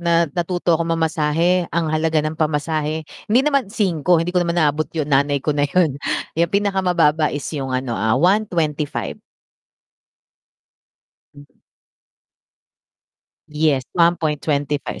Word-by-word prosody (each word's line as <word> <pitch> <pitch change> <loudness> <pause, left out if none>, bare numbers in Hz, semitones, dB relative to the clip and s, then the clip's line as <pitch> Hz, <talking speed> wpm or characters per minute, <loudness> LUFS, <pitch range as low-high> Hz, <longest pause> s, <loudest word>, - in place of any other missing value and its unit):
na 170 0 0 0.2
natuto 175 0 -1
akong 165 +1 0
mamasahe 165 +2 +1
ang 165 -2 -1
halaga 155 0 +1
ng 155 +1 -4
pamasahe, 155 0 -1 0.2
hindi 235 +4 +4
naman 275 -7 +1
5 180 -6 +1
hindi 175 +1 -4
ko 180 - +2
naman 170 0 -1
naabot 155 -1 +1
yung 150 -1 -2
nanay 140 0 +2
ko 150 - +1
na 145 0 +1
yun 155 -4 +1 0.4
yung 170 0 +2
pinakamababa 180 -6 +2
is 145 -1 -5
yung 135 -4 -3
ano 130 -1 -2
ah 110 +3 +1
125. 165 -4 0 2.1
Hmm. 145 0 -14 2.0
Yes, 150 -3 +1
1.25 150 -4 0
160 Hz, 120 wpm, -20 LUFS, 150-175 Hz, 2.1 s, hindi